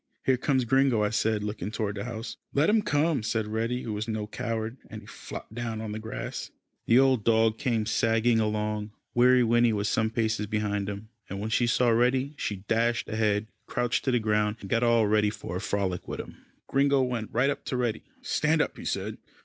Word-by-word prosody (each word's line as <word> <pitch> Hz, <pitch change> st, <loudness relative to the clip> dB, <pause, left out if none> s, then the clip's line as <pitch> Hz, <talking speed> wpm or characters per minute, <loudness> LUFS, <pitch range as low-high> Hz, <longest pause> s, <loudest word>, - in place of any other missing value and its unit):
"Here 130 Hz, -, +4 dB
comes 130 Hz, 0 st, +1 dB
Gringo," 130 Hz, -2 st, +3 dB
I 105 Hz, -, +1 dB
said, 110 Hz, -1 st, +1 dB
looking 105 Hz, -2 st, -4 dB
toward 105 Hz, -2 st, -2 dB
the 100 Hz, +1 st, -4 dB
house. 115 Hz, -1 st, -5 dB, 0.2 s
"Let 150 Hz, +8 st, +4 dB
him 220 Hz, 0 st, +4 dB
come," 150 Hz, -, +1 dB
said 110 Hz, 0 st, -1 dB
Reddy, 115 Hz, +3 st, -2 dB
who 110 Hz, -, -4 dB
was 105 Hz, +2 st, -3 dB
no 110 Hz, -2 st, -2 dB
coward, 115 Hz, +1 st, -4 dB
and 110 Hz, -, -8 dB
he -, -, -15 dB
flopped 105 Hz, -, -9 dB
down 115 Hz, -1 st, -4 dB
on 110 Hz, -1 st, -5 dB
the 110 Hz, -, -4 dB
grass. 110 Hz, +1 st, -5 dB, 0.4 s
The 115 Hz, -, +5 dB
old 130 Hz, -4 st, +4 dB
dog 110 Hz, 0 st, +3 dB
came 115 Hz, -6 st, 0 dB
sagging 115 Hz, +1 st, +2 dB
along. 105 Hz, -1 st, -1 dB, 0.2 s
Weary 125 Hz, +1 st, +5 dB
Winnie 120 Hz, 0 st, +3 dB
was 100 Hz, -1 st, -1 dB
some 110 Hz, 0 st, +1 dB
paces 110 Hz, -2 st, -1 dB
behind 105 Hz, -2 st, -1 dB
him, 105 Hz, +2 st, -7 dB, 0.2 s
and 95 Hz, -, -5 dB
when 110 Hz, +2 st, -3 dB
she 120 Hz, +2 st, +2 dB
saw 120 Hz, +1 st, +3 dB
Reddy 130 Hz, +4 st, +2 dB
she 100 Hz, -8 st, -4 dB
dashed 115 Hz, +1 st, +1 dB
ahead, 110 Hz, -1 st, +1 dB, 0.2 s
crouched 120 Hz, -2 st, 0 dB
to 130 Hz, -, +2 dB
the 125 Hz, -, +3 dB
ground, 105 Hz, -1 st, +1 dB
and 95 Hz, -, -9 dB
got 115 Hz, -, +3 dB
all 115 Hz, -2 st, +4 dB
ready 105 Hz, 0 st, +3 dB
for 95 Hz, -4 st, -6 dB
a -, -, -5 dB
frolic 95 Hz, -4 st, -2 dB
with -, -, -5 dB
him. -, -, -7 dB, 0.3 s
Gringo 140 Hz, 0 st, +3 dB
went 120 Hz, -4 st, -2 dB
right 125 Hz, +5 st, +2 dB
up -, -, -5 dB
to 130 Hz, -, -2 dB
Reddy. 120 Hz, -3 st, -1 dB, 0.2 s
"Stand 155 Hz, +1 st, +1 dB
up," -, -, -1 dB
he -, -, -8 dB
said. -, -, -3 dB
110 Hz, 215 wpm, -27 LUFS, 105-125 Hz, 0.4 s, The